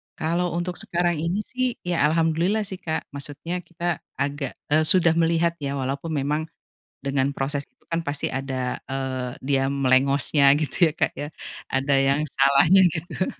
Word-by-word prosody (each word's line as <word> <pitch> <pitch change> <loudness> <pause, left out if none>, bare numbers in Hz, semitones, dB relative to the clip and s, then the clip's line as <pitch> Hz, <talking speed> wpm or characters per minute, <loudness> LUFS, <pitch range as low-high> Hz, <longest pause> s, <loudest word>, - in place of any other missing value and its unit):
Kalau 170 +2 -1
untuk 175 +1 -2
sekarang 175 -2 0
ini, 180 +6 -1
sih, 255 -1 -2
ya, 175 -4 +2
alhamdulillah, 165 +6 +1
sih, 190 -1 -6
Kak, 160 -3 -3
maksudnya 145 +5 -5
kita 175 -2 -3 0.2
agak 140 0 -3 0.2
eee, 155 +1 +4
sudah 175 -3 +5
melihat, 170 0 +1
ya, 140 -1 -3
walaupun 140 +4 -3
memang 150 +3 -1 0.6
dengan 140 0 0
proses 140 +1 -2
itu, - - -42
kan, 165 0 0
pasti 145 0 -2
ada, 130 -1 -3
eee, 130 -1 -3
dia 135 -1 +1
melengosnya 140 +1 +4
gitu 155 +3 +2
ya, - - -4
Kak, - - +1
ya, 145 - -4 0.4
ada 135 +1 +1
yang 140 +2 +2
salahnya 140 +6 +4
gitu. 175 +3 -3
150 Hz, 155 wpm, -24 LUFS, 140-170 Hz, 0.6 s, sudah